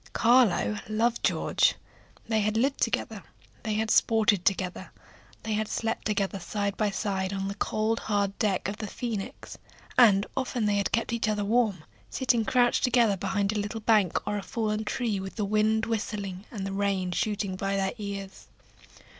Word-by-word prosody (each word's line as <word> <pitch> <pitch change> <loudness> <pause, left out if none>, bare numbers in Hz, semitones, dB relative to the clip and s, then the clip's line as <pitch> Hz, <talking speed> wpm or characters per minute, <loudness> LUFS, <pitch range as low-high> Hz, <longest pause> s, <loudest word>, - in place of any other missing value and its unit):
Carlo 235 -3 +3
loved 230 +2 0
George. - - +2 0.5
They 220 -1 +1
had 215 +1 0
lived 270 +4 +1
together, - - -1 0.4
they 215 -2 -2
had 220 +1 0
sported 215 -4 +3
together, 185 -2 -1 0.5
they 220 - -2
had 215 0 -1
slept 225 +1 -2
together 200 -2 -1
side 200 +2 -2
by 215 -1 +1
side 195 -1 -2
on 195 -1 -3
the 200 - -3
cold, 215 +2 -1
hard 200 -2 -1
deck 205 -5 0
of 200 +1 -4
the 215 - -5
Phoenix, 220 -3 -5 0.4
and 205 -4 +6
often 250 -3 -1
they 205 -1 +2
had 200 - 0
kept 230 +1 0
each 230 -1 0
other 210 -1 0
warm, 215 -6 +1 0.3
sitting 250 -3 +1
crouched 245 0 +2
together 240 -5 +4
behind 200 +1 -1
a 215 - -1
little 210 +2 -4
bank 210 -5 +3
or 210 0 -1
a - - -5
fallen 215 +1 -2
tree, 220 -3 -1
with 190 0 -7
the 210 - -1
wind 215 +2 +2
whistling 205 -4 -4
and 200 -4 -5
the 195 - -4
rain 195 -2 0
shooting 200 0 -1
by 195 +1 -2
their 190 -1 0
ears. 200 -2 -6
210 Hz, 175 wpm, -27 LUFS, 195-225 Hz, 0.5 s, and